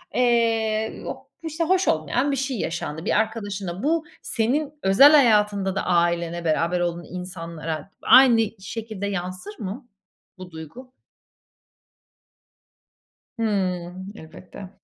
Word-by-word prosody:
eee, 225 Hz, -3 st, +1 dB
o, -, -, -7 dB, 0.2 s
işte, 320 Hz, +1 st, -2 dB
hoş 370 Hz, +3 st, +2 dB
olmayan 245 Hz, -, +1 dB
bir -, -, 0 dB
şey 265 Hz, -1 st, -2 dB
yaşandı 160 Hz, -2 st, -4 dB
bir -, -, +2 dB
arkadaşınla. 205 Hz, -4 st, -3 dB
Bu 320 Hz, +2 st, +1 dB, 0.2 s
senin 275 Hz, +6 st, -1 dB
özel 245 Hz, +10 st, +7 dB
hayatında 210 Hz, -8 st, +4 dB
da -, -, -2 dB
ailene, 170 Hz, -1 st, 0 dB
beraber 165 Hz, +2 st, +1 dB
olduğun 175 Hz, -1 st, -2 dB
insanlara 165 Hz, -3 st, -6 dB
aynı 255 Hz, -3 st, +7 dB, 0.2 s
şekilde 215 Hz, 0 st, -5 dB
yansır 185 Hz, +1 st, -5 dB
mı 225 Hz, +5 st, -6 dB, 0.5 s
bu 185 Hz, -1 st, -10 dB
duygu? 165 Hz, -, -11 dB, 2.5 s
Hımm. 185 Hz, -3 st, -2 dB
Elbette. 180 Hz, +2 st, -11 dB
200 Hz, 110 wpm, -23 LUFS, 175-235 Hz, 2.5 s, özel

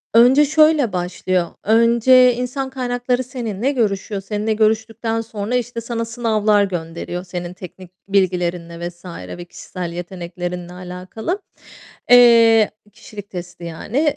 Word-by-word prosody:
Önce 260 Hz, +5 st, +7 dB
şöyle 305 Hz, -6 st, +3 dB
başlıyor. 180 Hz, 0 st, -1 dB, 0.2 s
Önce, 235 Hz, +3 st, +5 dB
insan 255 Hz, +2 st, -3 dB
kaynakları 250 Hz, -1 st, -1 dB
seninle 245 Hz, -1 st, -3 dB
görüşüyor, 205 Hz, -5 st, -1 dB
seninle 210 Hz, +2 st, -2 dB
görüştükten 225 Hz, +1 st, 0 dB
sonra 225 Hz, +1 st, -4 dB
işte 245 Hz, -1 st, -2 dB
sana 230 Hz, 0 st, -3 dB
sınavlar 220 Hz, -3 st, +2 dB
gönderiyor 175 Hz, -1 st, -4 dB
senin 175 Hz, -1 st, -6 dB
teknik 185 Hz, 0 st, -11 dB, 0.2 s
bilgilerinle 175 Hz, -3 st, -1 dB
vs. 175 Hz, +1 st, -20 dB, 0.3 s
ve 175 Hz, -, -8 dB
kişisel 175 Hz, 0 st, -7 dB
yeteneklerinle 175 Hz, 0 st, -6 dB
alakalı. 185 Hz, -, -5 dB, 0.7 s
Eee, 230 Hz, -3 st, +7 dB, 0.2 s
kişilik 205 Hz, -2 st, -11 dB
testi 175 Hz, -1 st, -8 dB
yani. 250 Hz, -, -1 dB
215 Hz, 115 wpm, -20 LUFS, 180-240 Hz, 0.7 s, Önce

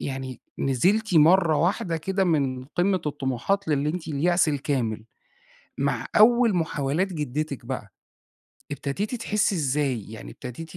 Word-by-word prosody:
يعني 130 Hz, -2 st, -5 dB, 0.2 s
نزِلتِ 185 Hz, -, +1 dB
مرّة 165 Hz, 0 st, +5 dB
واحدة 170 Hz, 0 st, 0 dB
كده 190 Hz, +4 st, -1 dB
من 135 Hz, -7 st, 0 dB
قمة 180 Hz, +6 st, 0 dB
الطموحات 145 Hz, +7 st, -1 dB
للي 145 Hz, 0 st, +1 dB
أنتِ 165 Hz, 0 st, -4 dB
اليأس 170 Hz, +3 st, +2 dB
الكامل، 130 Hz, -7 st, -1 dB, 0.7 s
مع -, -, -1 dB
أول 235 Hz, -1 st, +5 dB
محاولات 160 Hz, +2 st, -1 dB
جدتِك 150 Hz, -2 st, -3 dB
بقى 120 Hz, -5 st, -5 dB, 0.8 s
ابتديتِ 145 Hz, -, -3 dB
تحسي 210 Hz, -3 st, 0 dB
إزاي، 135 Hz, -, -1 dB
يعني 110 Hz, -, -9 dB
ابتديتِ 140 Hz, +6 st, -9 dB
150 Hz, 125 wpm, -25 LUFS, 135-180 Hz, 0.8 s, مرّة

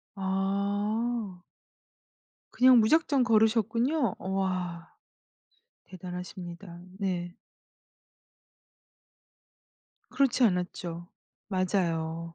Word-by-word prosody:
아. 200 Hz, +2 st, -1 dB, 1.1 s
그냥 255 Hz, -1 st, +6 dB
무작정 285 Hz, +2 st, +3 dB
걸으셨군요. 230 Hz, -, +2 dB
우와. 185 Hz, -3 st, -3 dB, 0.9 s
대단하십니다. 180 Hz, -1 st, -8 dB, 0.2 s
네. 180 Hz, -3 st, -3 dB, 2.7 s
그렇지 260 Hz, -1 st, +2 dB
않았죠. 180 Hz, -3 st, -2 dB, 0.4 s
맞아요. 170 Hz, -4 st, -1 dB
195 Hz, 140 characters per minute, -28 LUFS, 180-225 Hz, 2.7 s, 그냥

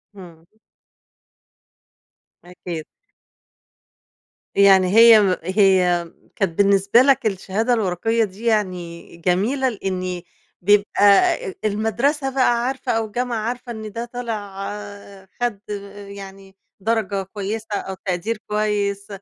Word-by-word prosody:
إمم. 170 Hz, -4 st, -14 dB, 2.0 s
أكيد. 175 Hz, -3 st, -7 dB, 1.7 s
يعني 195 Hz, -2 st, +6 dB
هي 225 Hz, +2 st, +7 dB
م 185 Hz, -2 st, +2 dB
هي 185 Hz, -3 st, +2 dB, 0.2 s
كانت 180 Hz, -5 st, -2 dB
بالنسبة 200 Hz, +3 st, +4 dB
لك 270 Hz, -3 st, +3 dB
الشهادة 215 Hz, +4 st, 0 dB
الوَرَقيَّة 225 Hz, +2 st, 0 dB
دي 205 Hz, +3 st, -7 dB
يعني 180 Hz, -6 st, -2 dB
جميلة، 210 Hz, -, 0 dB
لإني 185 Hz, -5 st, -4 dB, 0.4 s
بيبقى 205 Hz, +2 st, +2 dB, 0.7 s
المدرسة 235 Hz, +7 st, 0 dB
بقى 240 Hz, -2 st, +2 dB
عارفة، 265 Hz, -1 st, -3 dB
أو 225 Hz, 0 st, 0 dB
الجامعة 240 Hz, +2 st, -3 dB
عارفة، 245 Hz, 0 st, -5 dB
إن 220 Hz, -2 st, -7 dB
ده 230 Hz, +3 st, -5 dB
طالع 215 Hz, -5 st, -6 dB, 0.8 s
خد 235 Hz, -5 st, -1 dB, 0.5 s
يعني 195 Hz, -1 st, -11 dB, 0.2 s
درجة 205 Hz, -2 st, -1 dB
كويسة 210 Hz, +2 st, -5 dB
أو 190 Hz, -1 st, -4 dB
تقدير 190 Hz, +5 st, -2 dB
كويس، 205 Hz, -1 st, -1 dB
205 Hz, 100 wpm, -21 LUFS, 190-230 Hz, 2.0 s, هي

